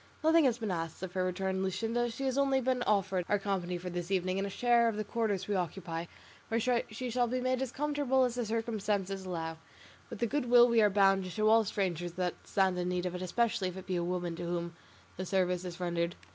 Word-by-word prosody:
"Nothing 320 0 +5
has 240 -3 +3
been 220 -4 -3
asked 165 0 -4
of 185 -1 -5
her," 185 -1 0
returned 190 +1 -1
Luscinda; 230 +5 -1
"she 270 - -6
has 260 -1 0
only 275 -1 +3
been 255 0 0
offered 195 -3 +2
our 205 - +3
company 190 -3 -2
for 180 +1 -6
this 175 0 -4
evening 185 0 0
and 200 - -1
a - - -4
share 235 +3 +3
of 225 - 0
the 215 - -2
quarters 210 -4 -1
we 205 - -1
occupy, 170 -2 -3 0.4
where 230 - 0 0.3
she 240 +3 -5
shall 245 +1 +2
be 255 +2 -1
made 255 0 0
as 265 -3 -2
comfortable 285 -2 +1
as 250 -2 +1
the 245 0 -2
circumstances 210 -4 -2
allow, 165 -2 -4 0.5
with - - -6
the 235 - 0
good 245 +1 -1
will 240 0 +8
we 235 -2 +4
are 210 - +5
bound 195 -1 +4
to 185 - -6
show 215 +4 +1
all 225 0 +6
strangers 175 -4 -2
that 180 -1 -1
stand 190 -3 +1
in 180 0 -1
need 180 0 -1
of 180 - -2
it, 180 - -5
especially 195 +1 0
if 185 +1 -6
it 190 - -8
be 185 - -2
a 175 - 0
woman 175 -1 -2
to 170 - -6
whom 170 0 -3 0.4
the 185 - -3
service 180 -1 +1
is 175 0 -6
rendered." 170 -1 -1
195 Hz, 240 wpm, -31 LUFS, 180-235 Hz, 0.5 s, will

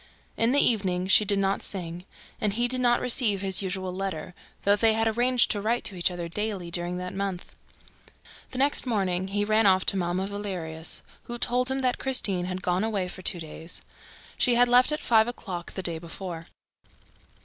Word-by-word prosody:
In 230 +1 +2
the 280 - +2
evening, 190 -8 +3
she 190 +3 +5
did 200 0 +1
not 195 0 0
sing; 175 -2 -6 0.4
and 210 -2 +1
he 240 +3 +1
did 255 +1 -1
not 240 -1 +3
receive 230 -6 +3
his 190 -1 +1
usual 185 -1 -3
letter, 185 -2 -4 0.3
though 200 +1 +4
they 220 +1 +3
had 225 0 +1
arranged 245 +2 +2
to 205 - -1
write 230 +3 0
to 195 - -2
each 175 0 +2
other 175 -1 -5
daily 195 -1 -4
during 175 +1 -1
that 180 0 -5
month. 195 -2 -4 1.0
The 255 - -8
next 275 0 +3
morning, 190 -5 0
he 205 +1 -1
ran 215 0 +3
off 185 -1 +4
to 195 - +3
Mamma 180 +1 -1
Valerius, 185 -6 -6 0.2
who 240 - -3
told 250 +2 0
him 265 +1 -1
that 255 -1 0
Christine 200 -9 +1
had 185 0 -5
gone 180 +2 0
away 205 -4 -1
for 185 - -8
two 175 - -1
days. 160 +1 -7 0.6
She 245 -2 +4
had 245 +1 +5
left 250 +3 +5
at 300 - -1
five 220 -1 +4
o'clock 185 -8 -6
the 190 - -5
day 165 -2 0
before. 170 0 -7
195 Hz, 195 wpm, -26 LUFS, 180-230 Hz, 1.0 s, she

